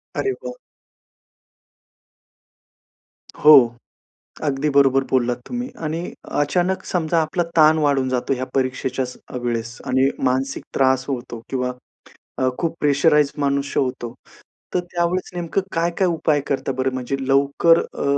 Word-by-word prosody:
अरे 400 - 0
वाह! - - -6 2.9
हो, 155 +1 +9 0.9
अगदी 145 0 0
बरोबर 135 -1 +5
बोललात 125 -2 +1
तुम्ही 245 +1 -4 0.2
आणि 165 +3 -3 0.3
अचानक 180 +6 0
समजा 165 -2 0
आपला 160 +3 -1
ताण 155 0 +6
वाढून 140 -3 +1
जातो 130 +1 -1
या 130 -1 -1
परीक्षेच्याच 130 -1 -2
अ, - - -7
वेळेस 120 -1 -3
आणि 130 +1 +3 0.2
मानसिक 130 +1 0
त्रास 130 -1 +2
होतो 120 -3 -5
किंवा 125 -1 -1 0.7
अ, 130 - +2
खूप 165 -2 -1
प्रेशराइज्ड 150 0 +3
मनुष्य 140 0 0
होतो. 125 -3 -3 0.6
तर 180 - +3
त्यावेळेस 175 +1 -1
नेमकं 175 +2 -1
काय-काय 170 +3 0
उपाय 160 -3 +1
करता 135 -1 -1
बरं? 130 0 0
म्हणजे 130 +1 -2
लवकर 140 +5 +4
अ, - - -6
140 Hz, 125 wpm, -21 LUFS, 130-165 Hz, 2.9 s, हो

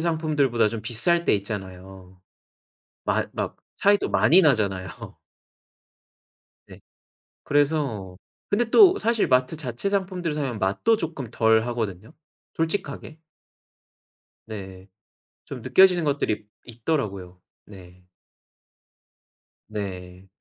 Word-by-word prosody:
상품들 155 -4 +1
보다 115 -2 +3
좀 115 -1 -5
비쌀 145 +10 +1
때 - - +3
있잖아요. 95 -2 -7 0.9
맛 - - 0
막 - - -4 0.2
차이도 205 0 +3
많이 185 +3 +5
나잖아요. 100 - +1 1.8
네. - - -14 0.6
그래서 140 -11 0 0.3
근데 230 +2 +1
또 390 -4 +7
사실 225 -2 +1
마트 130 +2 +2
자체 140 - -3
상품들을 185 -5 -2
사면 135 -7 -3
맛도 100 - +1
쪼끔 155 - -5
덜하거든요, 110 - 0 0.4
솔직하게. 160 -2 -3 1.3
네, 95 -3 -9 0.6
좀 - - -8
느껴지는 185 -3 +4
것들이 110 -8 -1 0.2
있더라고요. 105 - -4 0.2
네. 90 -2 -15 1.7
네, 95 -3 -7
120 Hz, 210 characters per minute, -24 LUFS, 95-160 Hz, 1.8 s, 또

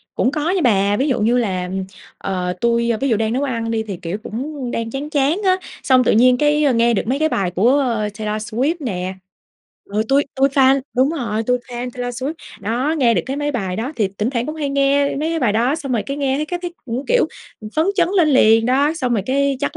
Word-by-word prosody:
Cũng 255 - +1
có 305 +2 -1
nha 370 -1 +1
bà. 200 -4 +3
Ví 270 - +1
dụ 255 - +1
như 235 +3 +3
là, 185 -6 -1
ừm, 190 +1 -4 0.3
ờ, 180 -1 -2
tui, 235 0 +2
ơ, 225 - 0
ví 275 - +1
dụ 220 - +2
đang 220 +1 0
nấu 270 +3 0
ăn 230 -4 -2
đi 220 -1 -1
thì, 200 -4 -6
kiểu, 175 +4 -3
cũng 260 +2 -5
đang 230 0 -3
chán 280 +4 -4
chán 300 +5 +1
á, 370 -1 +4 0.3
xong 255 -1 +4
tự - - +3
nhiên 250 +3 +5
cái, 295 +1 +2
ơ, 280 -3 +3
nghe 235 0 +3
được - - 0
mấy 265 +4 0
cái 315 0 +2
bài 190 - -1
của 245 +10 +3 0.3
Taylor 215 0 -3
Swift 250 +9 -1
nè, 190 - -3 0.7
ừ, 210 +2 -1
tui 280 +1 +3
tui 270 +1 +3
fan 270 0 +4 0.2
đúng 265 +3 +3
rồi, 230 -9 -2
tui 250 +2 +1
fan 245 0 -6
Taylor 245 -1 -4
Swift. 280 +4 -1 0.3
Đó, 245 +9 -1
nghe 235 -4 +4
được - - +1
cái 270 +2 -3
mấy 290 0 -1
bài 190 -6 -2
đó, 250 +8 -3
thì 210 -4 +1
tỉnh 215 +5 0
thoảng 240 -1 -2
cũng 305 - -4
hay 290 -2 -2
nghe 280 0 +2
mấy 320 +3 -1
bài 240 -8 +1
đó 240 +6 +2
xong 275 -5 -4
rồi 225 - +1
cái 275 - -3
nghe 275 -2 0
thấy 305 +1 -2
cái 355 +1 -3
thấy 345 -1 -5
cũng, 245 +3 -4
kiểu, - - +3 0.3
ừm, 215 -1 -8
phấn 315 +3 +3
chấn 350 -3 +2
lên 340 -5 +4
liền 225 -5 +5
đó. 280 +5 +2
Xong 255 -6 -1
rồi 210 - +1
cái 275 +1 +1
chắc 285 - -2
255 Hz, 255 wpm, -19 LUFS, 225-285 Hz, 0.7 s, nhiên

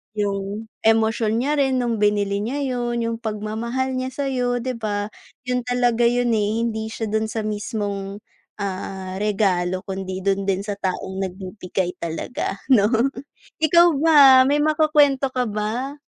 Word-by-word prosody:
Yung 205 +1 -3
emosyon 225 +1 +2
niya 290 +1 0
rin 265 -1 +2
nung 240 -3 0
binili 205 -1 +1
niya 270 +7 -2
yun, 240 -2 -1
yung 230 0 -2
pagmamahal 225 +4 -3
niya 255 - -2
sayo 250 -3 -1
di 260 - -1
ba? 210 -3 -3 0.3
Yun 250 0 -1
talaga 245 -1 +2
yun, 245 0 +1
eh. 215 +2 0
Hindi 220 -1 -3
siya 225 -1 -4
dun 220 0 +1
sa 220 0 -3
mismong, 205 -2 -3 0.4
ah, 190 -1 -5
regalo 185 -3 0
kundi 190 -1 -5
dun 195 0 0
din 195 +1 0
sa 205 - -2
taong 190 0 -3
nagbibigay 185 -1 -4
talaga 170 +5 -3 0.2
no. 205 -3 +5 0.7
Ikaw 340 +2 +6
ba, 325 -1 +4 0.3
may 290 - +3
makukwento 300 -3 +3
ka 250 - +2
ba? 240 +7 -3
220 Hz, 145 wpm, -22 LUFS, 200-245 Hz, 0.7 s, Ikaw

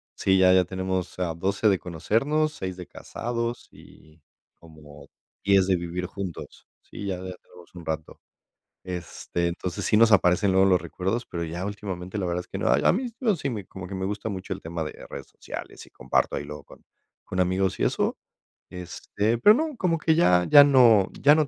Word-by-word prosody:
sí, 95 0 +2
ya 95 0 +6
ya 95 0 +5
tenemos, 95 0 -3
ah, 85 -3 -1
12 100 +5 +1
de 95 - +3
conocernos, 135 - 0
6 95 -9 -5
de 90 - -8
casados 120 0 -5
y 80 +1 -18 0.3
como 75 -3 -15 0.4
diez 100 -2 +4
de 95 - +3
vivir 85 +1 -4
juntos, 95 -3 -8
sí, 100 - -9
ya 95 -2 -2
ya 95 0 -7
tenemos 90 -1 -18
un 85 -2 -10
rato, 80 -1 -5 0.6
este, 90 -1 -4
entonces, 85 +1 -4
sí - - +2
nos 115 +1 +6
aparecen 95 0 +4
luego 95 +1 +5
los 90 -2 +4
recuerdos, 95 - -3
pero 85 -1 -4
ya 85 +3 -5
últimamente, 100 -2 -5
la 95 - -1
verdad 85 0 -1
es - - -11
que - - -5
no. - - +1
Ay, 70 +3 +3
a - - +5
mí, 250 +7 -1
yo 220 -7 +2
sí 140 -3 -3
me 105 -5 -5
como 95 -2 -9
que 95 - -7
me 95 0 -3
gusta 105 +2 -4
mucho 95 -2 -5
el - - -10
tema 80 0 -4
de 75 - -6 0.2
redes - - -7
sociales - - -9
y - - -20
comparto - - 0
ahí - - -4
luego 75 +1 -9
con - - -17 0.4
con 95 - -6
amigos 95 +1 +1
y - - -1
eso, - - 0 0.5
este, 100 +5 -3
pero 210 - +7
no, 310 +2 -2
como 180 -7 0
que 160 0 +2
ya 90 - +4
ya 145 -1 +9
no 120 -8 +5
ya 145 - +6
no 155 -1 +2
95 Hz, 205 wpm, -25 LUFS, 90-110 Hz, 0.6 s, ya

